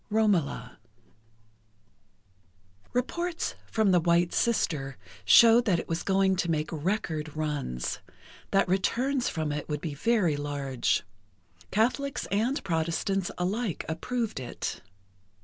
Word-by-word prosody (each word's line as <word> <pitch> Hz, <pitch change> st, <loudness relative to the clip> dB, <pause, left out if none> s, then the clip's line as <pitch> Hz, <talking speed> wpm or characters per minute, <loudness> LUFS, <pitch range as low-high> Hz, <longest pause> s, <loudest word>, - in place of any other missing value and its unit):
III 210 Hz, -, -3 dB
"ROMOLA" 200 Hz, -9 st, +1 dB, 2.1 s
Reports 340 Hz, +8 st, -2 dB
from 220 Hz, -3 st, +2 dB
"The 180 Hz, -, +5 dB
White 170 Hz, +1 st, +2 dB
Sister" 145 Hz, -, 0 dB, 0.3 s
showed 230 Hz, -, +7 dB
that 190 Hz, -6 st, +3 dB
it -, -, -4 dB
was 165 Hz, 0 st, -2 dB
going 190 Hz, -1 st, +2 dB
to 175 Hz, -, 0 dB
make 155 Hz, -1 st, -1 dB
record 155 Hz, -2 st, -2 dB
runs—that 150 Hz, -, -3 dB
returns 245 Hz, +8 st, +1 dB
from 155 Hz, -3 st, -2 dB
it 150 Hz, +1 st, -4 dB
would 150 Hz, -1 st, -1 dB
be 155 Hz, -2 st, -4 dB
very 185 Hz, -1 st, +2 dB
large. 140 Hz, -3 st, -1 dB, 0.7 s
Catholics 255 Hz, +6 st, 0 dB
and 230 Hz, +8 st, 0 dB
Protestants 175 Hz, +2 st, -1 dB
alike 195 Hz, +2 st, -2 dB
approved 225 Hz, -, -2 dB
it. 125 Hz, -, -5 dB
180 Hz, 115 wpm, -28 LUFS, 155-220 Hz, 2.1 s, showed